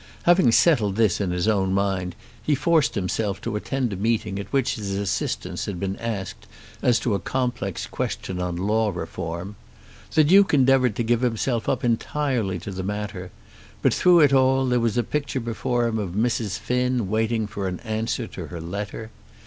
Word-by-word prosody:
Having 175 -8 +5
settled 115 - +4
this 110 -3 +2
in 95 - 0
his 90 +3 -1
own 95 -3 +2
mind 95 -3 -1 0.3
he 145 +6 +1
forced 150 +1 +2
himself 100 +1 -1
to 115 -2 -3
attend 125 +1 -2
a - - -3
meeting 105 -1 -1
at 100 - -7
which 135 -3 +1
his 100 -3 -4
assistance 100 -1 -2
had 95 -4 -4
been 95 +1 -2
asked 105 -5 -5 0.3
as 120 -3 +3
to 115 - 0
a 100 - 0
complex 120 -8 -2
question 90 -1 -4
on 90 -1 -2
Law 105 +4 +1
Reform. 85 +1 -5 0.6
The 155 - +6
Duke 190 +2 +5
endeavoured 130 -4 +4
to 120 - -1
give 120 +1 +1
himself 120 -1 0
up 130 0 0
entirely 120 -4 0
to 100 - -6
the 95 -1 -4
matter; 100 -1 -4 0.5
but - - +4
through 175 -2 +5
it 145 -2 +5
all 135 0 +4
there 125 -1 +2
was 115 -1 0
the 120 - +2
picture 140 +2 -2
before 120 +1 -1
him 115 -1 -1
of 95 -4 -4
Mrs. 110 -2 0
Finn 125 -3 0
waiting 110 +2 0
for 100 -1 -4
an 90 -1 -4
answer 110 0 -2
to - - -8
her 85 - -7
letter. 100 +6 -6
110 Hz, 185 wpm, -24 LUFS, 100-125 Hz, 0.6 s, The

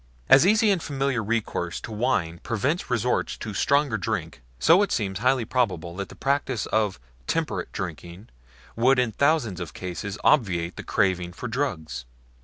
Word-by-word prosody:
As 140 +6 +7
easy 215 +1 +4
and 185 -4 +1
familiar 135 -5 -1
recourse 105 -6 -2
to - - -8
wine 85 -7 0
prevents 140 - -1
resort 125 0 0
to 110 - -5
stronger 140 0 +2
drinks, 90 - -3 0.2
so 170 - +5
it 205 - 0
seems 95 -3 -1
highly 125 0 +2
probable 90 -9 -1
that 100 -1 -4
the - - -12
practice 135 -4 -1
of 105 -6 0 0.3
temperate - - -2
drinking 90 +5 -7 0.5
would 130 +4 +4
in 125 -2 +2
thousands 140 - +1
of 85 -3 -7
cases 95 +3 -5
obviate 90 - +2
the - - -6
craving 90 -2 0
for 125 - -6
drugs. 110 - -3
110 Hz, 160 wpm, -25 LUFS, 95-135 Hz, 0.5 s, As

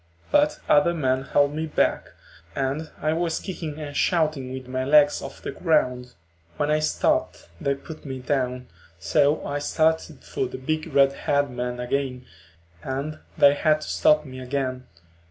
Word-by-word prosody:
But 295 +1 +3
other 170 -3 +4
men 130 -3 0
held 145 0 +2
me 160 +1 -2
back, 155 - +1 0.5
and 140 +4 -2
I 155 +1 +2
was 165 0 -1
kicking 165 -6 -6
and 145 -2 -7
shouting 155 -6 +1
with 130 -1 -7
my 130 0 -2
legs 145 +1 +5
off 135 - -9
the - - -3
ground. 125 -7 0 0.4
When 145 - 0
I 155 - +3
stopped 155 - 0
they 140 0 +1
put 155 +3 -11
me 135 -2 -5
down, 125 -1 -2 0.3
so 145 - +2
I 145 0 -2
started 160 0 0
for 130 - -2
the 125 - -7
big 155 +5 -2
red 140 0 +4
haired 145 -1 0
man 125 0 -4
again 125 0 -2 0.6
and 140 - -4 0.2
they 140 - +7
had 155 +1 +2
to - - -7
stop 150 0 +3
me 130 -1 -9
again. 130 -1 -3
140 Hz, 165 wpm, -24 LUFS, 130-155 Hz, 0.6 s, they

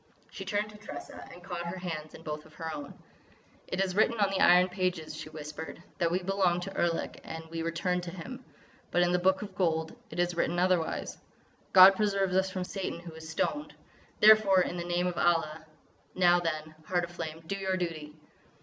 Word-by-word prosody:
She 195 - -7
turned 205 +2 -1
to 210 - -13
Tressa 210 - -9
and 175 - -13
caught 175 -2 -5
her 180 +2 -4
hands 160 -4 -5
in 160 - -12
both 150 -1 -5
of 155 - -20
her 160 -1 -5
own: 145 -2 -7 0.7
"It 185 - -3
is 190 -1 0
written 220 +2 +3
on 200 -1 +3
the 195 - -1
Iron 180 +1 +7
Pages," 180 -3 -2
she - - -7
whispered, 155 +2 -8 0.2
"that 170 -2 +2
we 180 +2 -1
belong 185 -2 +2
to 195 +2 -6
Erlik 170 -1 -1
and 160 0 -7
we 165 0 -3
return 180 +2 -1
to 175 - -6
him. 235 +9 -8 0.5
But 175 - +3
in 175 - +2
the 180 - +2
Book 190 +2 +2
of 200 -2 -8
Gold 160 -1 0
it - - -9
is 175 0 +1
written 175 +1 0
otherwise: 180 -2 0 0.5
'God 190 +1 +10
preserve 195 -2 +1
us 190 +1 +2
from 185 -1 -3
Satan 185 -2 -4
who 170 -1 -9
was 160 0 -10
stoned!'... 295 - -2 0.4
Therefore, 210 -3 +7
in 180 - -2
the 170 - -3
name 175 +1 0
of 180 -1 -2
Allah! 160 -2 +1 0.5
Now 175 -1 +5
then, 155 -2 -3
Heart 175 0 0
of 170 - -5
Flame, 165 -1 -6
do 195 - -3
your 190 -1 -1
duty!" 155 -4 -4
175 Hz, 205 wpm, -30 LUFS, 165-190 Hz, 0.7 s, God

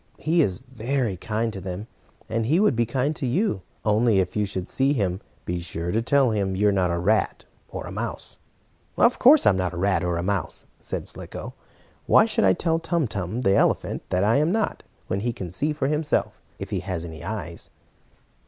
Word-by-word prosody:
He 165 +2 +2
is 95 - 0
very 120 -2 -1
kind 110 +4 -2
to 95 - -6
them, 95 +2 -5 0.4
and 110 0 -1
he 160 +7 +3
would 205 - +4
be 115 0 +1
kind 135 +5 0
to 135 - -3
you. 125 - 0 0.2
Only, 110 0 +3
if 95 -1 0
you 105 -1 +1
should 95 -2 -4
see 135 +2 +1
him, 95 -7 -1 0.2
be 90 0 -2
sure 85 0 -4
to 110 - +1
tell 135 0 +3
him 100 -3 0
you're 105 +2 +3
not 95 -2 +1
a 85 - 0
rat 100 +4 +1 0.2
or - - -6
a - - -7
mouse." - - -4 0.6
"Of 240 - +4
course 280 +4 +7
I'm 95 - +5
not 90 -1 -1
a - - -6
rat 95 +1 +1
or 90 -1 0
a 85 - -2
mouse," 95 -3 -2
said - - -4
Slicko. - - -7 0.5
"Why - - +6
should - - +1
I 95 - +6
tell 165 - 0
Tum 165 -3 0
Tum, 100 +3 -3
the 95 -6 +3
elephant, - - +1
that 90 +1 +1
I 110 +4 +4
am 155 +4 +2
not, 220 +1 0 0.2
when 95 - -2
he 120 +4 -1
can 95 -7 -6
see 145 - -1
for 150 -2 -2
himself, 150 0 0 0.2
if - - -7
he - - 0
has 85 -3 -4
any 80 -1 -8
eyes?" 85 -4 -6
105 Hz, 210 wpm, -24 LUFS, 95-135 Hz, 0.6 s, course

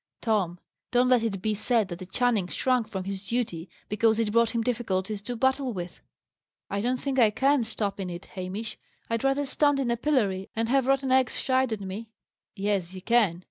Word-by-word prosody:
Tom, 200 -7 0 0.3
don't 250 +1 +3
let 250 -2 +5
it 195 -5 -2
be 215 - +1
said 220 0 +1
that 175 +1 -7
a 185 - -7
Channing 225 -2 +1
shrunk 250 +2 +1
from 190 -3 -4
his 195 +1 -6
duty 195 -8 -2 0.2
because 220 +1 +2
it 225 -2 +1
brought 230 +1 +4
him 230 -1 -1
difficulties 215 -4 -1
to 245 +4 -5
battle 265 +1 +1
with." 175 -2 -6 0.7
"I 200 0 0
don't 250 +3 0
think 270 -1 -1
I 225 -3 +6
can 270 +5 +2
stop 205 -3 -3
in 190 -2 -3
it, 175 +1 -7
Hamish. 195 +4 -5 0.3
I'd 230 +1 0
rather 270 +1 +2
stand 290 +1 +2
in 250 -3 0
a 235 - 0
pillory, 215 -9 0
and 225 +1 0
have 265 0 +3
rotten 270 -1 +2
eggs 260 -1 +3
shied 260 -2 +1
at 215 -2 -3
me." 200 +4 -6 0.5
"Yes, 195 -3 -1
you 185 - -7
can. 220 -8 +3
225 Hz, 205 wpm, -27 LUFS, 195-250 Hz, 0.7 s, I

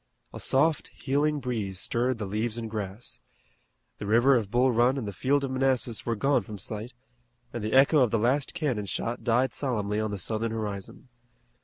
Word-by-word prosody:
A - - -7
soft 150 +4 +2
healing 145 +2 0
breeze 105 -8 -3
stirred 120 +4 0
the 105 - -4
leaves 110 +3 -2
and 115 -1 -4
grass. 105 +1 -5 0.8
The 105 - -5
river 120 +6 +5
of 110 -5 0
Bull 125 +4 +3
Run 120 +3 +3
and 120 -6 -3
the 100 - -4
field 140 +6 +1
of 135 - -2
Manassas 130 -4 0
were 115 - +1
gone 135 +7 +2
from 110 -3 -8
sight, 105 +4 -6 0.6
and 120 - -4
the 110 - -2
echo 140 +3 +6
of 125 -4 +4
the 115 - +1
last 130 +6 +1
cannon 125 -10 -1
shot 115 +5 -3
died 120 +2 +2
solemnly 105 -6 -1
on 110 0 -1
the 100 - -3
Southern 110 +4 -2
horizon. 105 +2 -5
120 Hz, 190 wpm, -27 LUFS, 105-130 Hz, 0.8 s, echo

